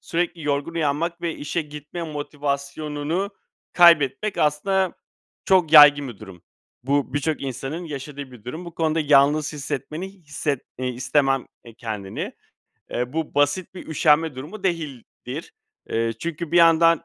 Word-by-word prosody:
sürekli 170 -1 -2
yorgun 145 +3 -1
uyanmak 165 +2 -1
ve 170 -2 -2
işe 155 +3 -3
gitme 150 +3 -8
motivasyonunu 150 +3 -3 0.4
kaybetmek 170 +3 +5
aslında 185 +5 +1 0.5
çok 180 -5 +3
yaygın 145 -2 +9
bir 115 -5 -9
durum. 95 -5 -12 0.4
Bu 140 0 0
birçok 145 +1 -1
insanın 135 +6 -4
yaşadığı 140 -2 -7
bir 115 -4 -14
durum. 155 +8 -6
Bu 170 -1 -9
konuda 160 -1 +1
yalnız 150 +1 +4
hissetmeni 150 +4 -5
hisset 150 -6 -3 0.2
eee, 130 - -1
istemem, 135 +1 +1 0.2
eee, 115 -2 -13
kendini. 105 -5 -5 0.6
Eee, 125 +1 -2
bu 160 0 -3
basit 145 +6 +1
bir 185 - -9
üşenme 155 -1 +3
durumu 150 +11 -8
değildir. 155 - -4 0.4
Eee, 115 0 0
çünkü 170 +1 -5
bir 175 - +3
yandan 165 0 +5
150 Hz, 135 wpm, -23 LUFS, 140-165 Hz, 0.6 s, yaygın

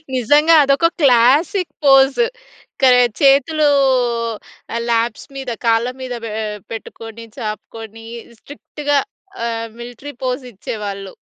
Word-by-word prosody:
నిజంగా 295 +7 +4
అదొక 280 +4 +3
classic 285 - +3
pose. 270 - +5 0.6
క - - -5 0.4
చేతులు 285 +3 +4 1.2
ల్యాప్స్ 230 -1 -1
మీద 265 -2 -5
కాళ్ళ 230 +1 +2
మీద 255 -1 -5
పే 225 - -5 0.4
పెట్టుకొని, 225 0 -9
చాపుకొని 225 0 -7 0.3
స్ట్రిక్ట్‌గా 290 +1 -3 0.5
ఆహ్, 230 0 -4
మిలిటరీ 245 +4 -9
పోజ్ 255 +1 -2
ఇచ్చేవాళ్ళు. 200 -1 -6
250 Hz, 95 wpm, -18 LUFS, 225-285 Hz, 1.2 s, పోజ్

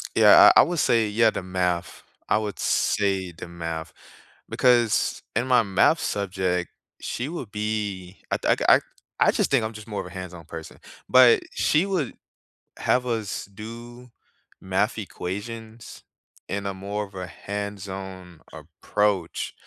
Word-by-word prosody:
Yeah, - - +8
I - - +9
I - - +6
would 175 -2 -2
say 115 -2 +3
yeah, 110 +2 +4
the 100 - -4
math, 90 -1 -2 0.3
I - - +4
would 105 -2 -3
say 95 -4 0
the 85 - -9
math, 80 -1 -5 0.6
because 120 -3 +2
in 115 +3 +1
my 125 -2 +5
math 100 - +3
subject, 95 -3 -1 0.3
she 125 +3 -3
would 150 -10 -6
be 105 -3 -4
I - - +2
th - - +1
I - - +8 0.4
I - - +5
just - - 0
think 130 -5 +3
I'm 110 - -5
just 110 0 -11
more 105 - -3
of - - -5
a - - -10
hands-on 90 -3 -8
person, 80 0 -9 0.3
but 130 -2 +7
she 155 +5 +2
would 185 -10 -2 0.7
have 125 0 +1
us 115 -4 -3
do 115 +4 -11 0.5
math 95 +4 0
equations 110 +3 -7 0.5
in 100 0 -3
a 100 - -2
more 100 +2 -4
of 100 -1 -18
a 90 -1 -5
hands-on 95 -3 -7
approach, 100 -5 -2
105 Hz, 150 wpm, -24 LUFS, 95-115 Hz, 0.7 s, I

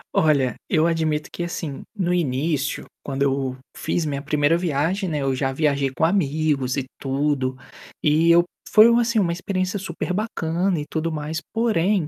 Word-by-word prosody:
Olha, 140 -6 +3
eu 160 0 +3
admito 160 -2 0
que, 175 - -4
assim, 165 -4 -5
no 180 -3 0
início, 145 -2 -1 0.2
quando 140 0 -2
eu 135 -2 0 0.2
fiz 160 +1 -1
minha 140 -2 -2
1º 150 +1 +2
viagem, 175 +4 0
né, 150 -2 -1
eu 135 -1 +1
já 135 0 0
viajei 140 -1 +1
com - - -1
amigos 150 -6 +1
e 135 - -1
tudo, 135 -1 0 0.5
e 155 +2 +3
eu 170 +1 +7 0.3
foi, 215 +1 +8
assim, 235 -1 +2
uma 180 -4 +2
experiência 185 +2 -2
super 180 -1 -4
bacana 180 -3 -1
e 145 - -4
tudo 165 +1 -2
mais 155 +1 -3
porém, 205 -6 +1
155 Hz, 165 wpm, -23 LUFS, 140-175 Hz, 0.5 s, foi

